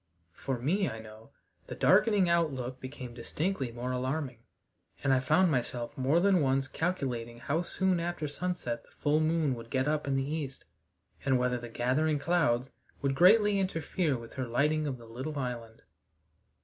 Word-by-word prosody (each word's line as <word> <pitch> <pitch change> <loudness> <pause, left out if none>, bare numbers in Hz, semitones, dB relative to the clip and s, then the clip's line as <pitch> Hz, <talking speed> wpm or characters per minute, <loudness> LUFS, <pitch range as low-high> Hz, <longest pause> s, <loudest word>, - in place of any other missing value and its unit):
For 130 +7 -3
me, 175 - +1
I 110 - -6
know, 110 0 -12 0.4
the - - -6
darkening 205 -5 +4
outlook 135 -7 0
became 130 -2 -7
distinctly 135 +3 -2
more 120 +2 -4
alarming, 130 0 -2 0.6
and 135 -1 +3
I 130 - +4
found 170 +7 +3
myself 120 -1 -2
more 135 +4 +2
than 190 -1 +4
once 135 -1 +1
calculating 130 -8 -2
how 140 +7 -1
soon 185 0 +1
after 170 -2 -2
sunset 145 -6 -3
the - - -24
full 150 +1 +1
moon 155 -3 +2
would 115 -1 -8
get 130 +2 0
up 150 -1 0
in 135 - +1
the 135 0 0
east, 145 -3 -4 0.6
and 135 -2 +3
whether 125 0 0
the 120 0 -8
gathering 130 +7 +1
clouds 140 -5 +1 0.3
would 140 -1 +2
greatly 200 +6 +5
interfere 165 -5 0
with 115 -1 -11
her 130 -2 -3
lighting 150 +5 +1
of 135 -3 -3
the 120 - -13
little 130 +7 -5
island. 120 -4 -5
135 Hz, 170 wpm, -30 LUFS, 125-165 Hz, 0.6 s, greatly